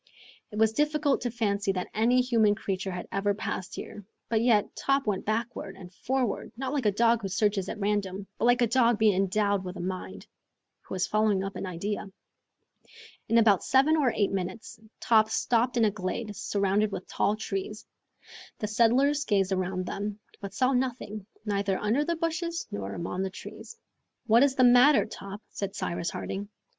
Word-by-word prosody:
It 210 - -8
was 220 0 +4
difficult 295 +1 +1
to 245 - -1
fancy 200 -4 0
that 180 -1 -4
any 240 +4 +3
human 225 -4 +3
creature 195 -2 -3
had 180 -1 -5
ever 200 +1 0
passed 190 -3 -4
there, 210 - -8 0.3
but 220 -1 +2
yet 225 -4 +2
Top 275 0 +1
went 205 -3 -2
backward 220 -3 -3
and 185 -1 -12
forward, 255 +2 -2
not 265 +1 -3
like 270 -7 0
a - - +4
dog 230 +2 +3
who 195 - -3
searches 200 0 0
at - - -5
random, 200 -1 -1
but - - +1
like 245 0 +4
a - - +6
dog 235 -1 +3
being 215 -1 +4
endowed 200 +1 +1
with 180 0 -6
a - - -8
mind, 175 - -5 0.6
who - - -7
is 185 - +1
following 215 -2 +1
up 195 0 -5
an 195 - -4
idea. 200 +3 -4 1.2
In 230 - +4
about 215 -5 +4
seven 275 +4 +4
or 280 -6 +2
eight 205 -2 +1
minutes 195 +4 -5 0.2
Top 220 -2 +4
stopped 245 +1 +1
in 230 - +4
a 210 - +2
glade 205 +2 -4
surrounded 200 +2 0
with 185 - -6
tall 210 - 0
trees. 210 0 -5 0.7
The 210 - -3
settlers 255 +7 +3
gazed 195 -6 +1
around 185 -1 -1
them, 205 +2 -4 0.2
but 200 -1 -8
saw 255 +4 +2
nothing, 240 -5 -2 0.2
neither 200 -2 0
under 225 +8 +1
the 335 +2 -1
bushes 335 +1 -2
nor 100 -1 -5
among 175 +2 -3
the 190 - -1
trees. 335 - -10 0.5
"What 230 +1 +5
is 275 -1 +3
the 255 - +4
matter, 250 +4 +6
Top?" 200 -1 -9
said 200 0 -5
Cyrus 170 -3 -2
Harding. 200 +1 -5
210 Hz, 185 wpm, -28 LUFS, 195-240 Hz, 1.2 s, a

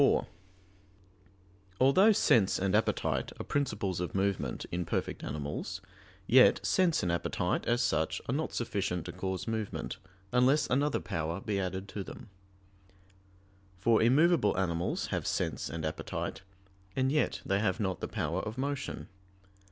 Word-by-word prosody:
4: - - +4 1.5
Although 185 +12 +6
sense 115 - +4
and 95 0 0
appetite - - +1
are - - -3
principles 105 -10 -1
of 90 +1 -3
movement 95 0 -1
in 90 +1 -1
perfect - - -3
animals, 75 -1 -4 0.5
yet - - +6
sense 180 -4 +2
and 90 - +1
appetite, 85 - -1
as 120 +1 +2
such, 80 -9 0
are - - -1
not 155 +3 -1
sufficient 100 -7 -2
to - - -5
cause 95 +1 -4
movement, 110 -2 -3 0.3
unless 125 +4 +4
another 145 +3 +1
power 80 +2 -3
be 100 -1 -2
added 95 +1 -3
to 100 - -4
them; 105 - -10 1.5
for 110 +4 +3
immovable 135 - +4
animals 85 -2 -1
have - - -1
sense - - -1
and 80 -1 -4
appetite, 80 - -4 0.5
and 130 0 +2
yet 150 0 0
they 100 0 +1
have 105 0 0
not 95 -3 -1
the - - -3
power 85 +5 -2
of 110 +2 -6
motion. 140 +1 -3
100 Hz, 145 wpm, -31 LUFS, 90-130 Hz, 1.5 s, Although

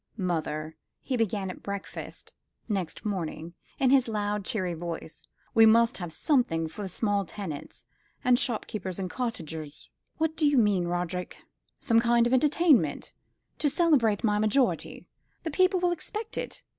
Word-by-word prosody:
"Mother," 160 -4 -2 0.3
he 260 - -1
began 205 -4 -1
at - - -12
breakfast 200 -1 -7 0.3
next 195 -6 -3
morning, 170 -4 -3 0.2
in 265 -2 +3
his 265 -3 +5
loud 210 -2 -1
cheery 185 -4 -1
voice, 165 -1 -7 0.3
"we 225 0 +7
must 230 +1 +4
have 175 -2 -5
something 165 - +1
for 165 - -9
the 195 - -4
small 205 +1 0
tenants, 175 -5 -8 0.4
and 250 -1 +4
shopkeepers, 210 -5 -3
and 185 -2 -4
cottagers." 160 - -5 0.3
"What 320 0 0
do 315 -2 +2
you 290 -1 +3
mean, 205 -6 +3
Roderick?" 175 +1 -3 0.4
"Some 230 -3 +3
kind 235 0 +3
of 240 - +1
entertainment 300 +1 +3 0.5
to 295 - +2
celebrate 270 - +3
my 210 -2 +2
majority. 215 +5 +1 0.4
The 325 - -3
people 370 +4 +3
will 355 0 +2
expect 420 +7 -5
it. - - -5
210 Hz, 150 wpm, -28 LUFS, 180-255 Hz, 0.5 s, we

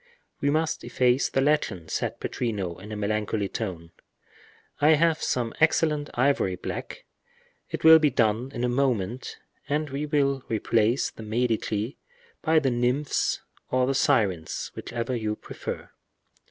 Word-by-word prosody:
"We 140 - +1
must 155 +2 0
efface 125 +1 +2
the 135 - +1
legend," 125 - 0
said - - -2
Pittrino, 100 -8 -3
in 105 +2 -9
a - - -4
melancholy 105 0 -1
tone. 90 -7 -5 0.9
"I 155 +2 +6
have 160 +1 +2
some 120 -3 -1
excellent 155 -2 +2
ivory 125 -7 +2
black; - - -6 0.6
it - - -5
will 160 0 +9
be 155 -2 +4
done 120 +1 +1
in 120 - -4
a - - +2
moment, 125 -3 -1 0.3
and 150 0 -1
we 145 +2 -3
will 140 -3 +1
replace 115 +2 +1
the - - -11
Medici 110 0 -1 0.4
by 160 0 +3
the 140 -4 +3
nymphs 125 +4 0 0.3
or 130 0 +2
the 135 - +1
sirens, 95 -10 +1
whichever 120 +1 -4
you 110 -2 -2
prefer." - - -7
125 Hz, 140 wpm, -26 LUFS, 110-145 Hz, 0.9 s, will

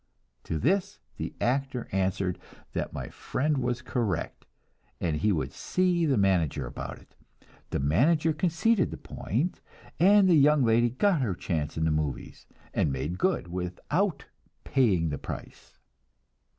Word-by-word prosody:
To 80 - -2
this 195 - +1 0.2
the - - -5
actor 130 0 -1
answered 95 -1 0 0.3
that - - -2
my - - -6
friend 145 +1 -1
was 125 0 -2
correct, 115 -6 -2 0.5
and 80 -3 0
he 105 +8 +2
would 80 -6 -1
see 180 -2 +1
the 135 -4 +2
manager 85 -8 +2
about - - -6
it. - - -21 0.5
The - - -1
manager 150 - +3
conceded 180 +6 +2
the - - -6
point, 145 - -3 0.4
and 195 +3 +6
the 180 - +5
young 150 -2 +5
lady 115 +1 +4
got 165 - +2
her 105 -8 0
chance 80 -4 -3
in 80 - +1
the 80 - +2
"movies" 75 -2 -3 0.3
and 75 - +1
made 75 +7 -3
good 185 - 0
without 95 - -2 0.4
"paying 100 - +2
the 70 - -3
price." - - -9
120 Hz, 145 wpm, -28 LUFS, -, 0.5 s, and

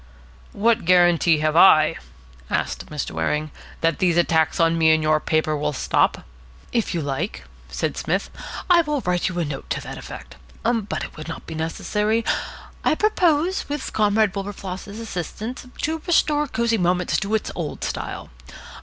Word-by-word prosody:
"What 225 +2 +2
guarantee 175 -2 +5
have 155 0 +1
I," 155 -3 +7 0.5
asked - - -2
Mr. - - -4
Waring, 150 - -1 0.3
"that 165 -1 +1
these 175 -2 +2
attacks 160 -2 +2
on 165 0 +4
me 160 -1 +4
in 160 - -1
your 155 0 +3
paper 155 0 0
will 150 0 -1
stop?" - - +1 0.5
"If 230 -6 0
you 165 - -1
like," 140 +8 -3 0.3
said - - -2
Psmith, - - -2 0.4
"I 350 -2 +6
will 300 -3 -2
write 180 -2 0
you 180 - -6
a 170 - 0
note 145 -2 -6
to - - -2
that - - -7
effect. 65 0 -10 0.3
But 225 -4 -1
it - - -8
will 155 - -8
not 160 - -7
be 160 - -7
necessary. 210 +8 -1 0.6
I - - +3
propose, 355 -4 +1
with 290 -1 -4
Comrade 210 -1 +3
Wilberfloss's 200 +1 -6
assistance, 225 +4 -5 0.2
to 320 +1 -1
restore 300 -3 +3
Cosy 230 -2 0
Moments 180 0 +1
to 210 +2 -1
its 220 - -2
old 165 -4 -5
style. - - -5
180 Hz, 165 wpm, -23 LUFS, 160-230 Hz, 0.6 s, I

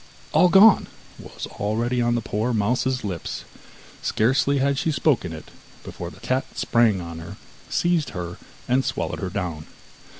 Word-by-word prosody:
'All 180 - +5
gone' 200 +3 +7 0.3
was - - -8
already 115 +4 0
on 120 0 +2
the 120 - 0
poor 110 +4 -1
mouse's 125 +4 0
lips; 90 -5 -4 0.6
scarcely 135 +5 +2
had 140 +1 +1
she 160 - 0
spoken 130 - +1
it 80 - -9 0.3
before - - -7
the - - -15
cat 130 +1 -2
sprang 115 -5 +3
on 85 -1 -7
her, 85 +5 -9 0.3
seized 170 -5 +1
her, 85 0 -5 0.3
and 130 +2 +2
swallowed - - -3
her 95 - -3
down. 90 -6 -4
120 Hz, 155 wpm, -23 LUFS, 95-135 Hz, 0.6 s, gone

